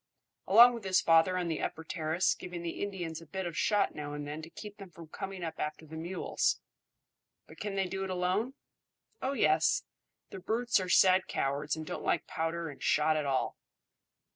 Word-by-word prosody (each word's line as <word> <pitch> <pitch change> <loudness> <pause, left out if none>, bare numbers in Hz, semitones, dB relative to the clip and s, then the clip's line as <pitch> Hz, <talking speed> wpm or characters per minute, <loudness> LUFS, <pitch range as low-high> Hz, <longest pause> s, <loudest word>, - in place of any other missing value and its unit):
"Along 235 +5 +9
with 230 -3 -6
his 190 -1 +3
father 165 +3 +4
on 180 -1 -1
the 160 -2 -2
upper 160 - -3
terrace, 160 +2 0
giving 175 -1 -7
the 170 - -4
Indians 175 -5 -4
a 165 - -13
bit 190 +4 -4
of 175 - -2
a - - -13
shot 205 +2 +2
now 145 -1 -6
and 145 0 -5
then 150 +2 -5
to 160 - -9
keep 210 +3 -10
them 195 -2 -10
from 165 -2 -13
coming 195 0 -6
up 160 -1 -5
after 150 +1 -4
the 160 +1 -10
mules." 170 +4 -1 0.9
"But - - -15
can 205 -1 -3
they 195 -1 +1
do 190 +1 -3
it 190 - -4
alone?" 185 +8 0 0.7
"Oh 265 +1 -1
yes; - - +3 0.5
the 195 - -7
brutes 230 +4 +1
are 185 -1 -4
sad 185 +1 +5
cowards 140 +2 -1
and 160 0 -6
don't - - -5
like - - +1
powder 165 +1 -2
and 145 - -10
shot 155 +1 +3
at 150 -2 -1
all." 135 -1 0
175 Hz, 205 wpm, -31 LUFS, 160-195 Hz, 0.9 s, Along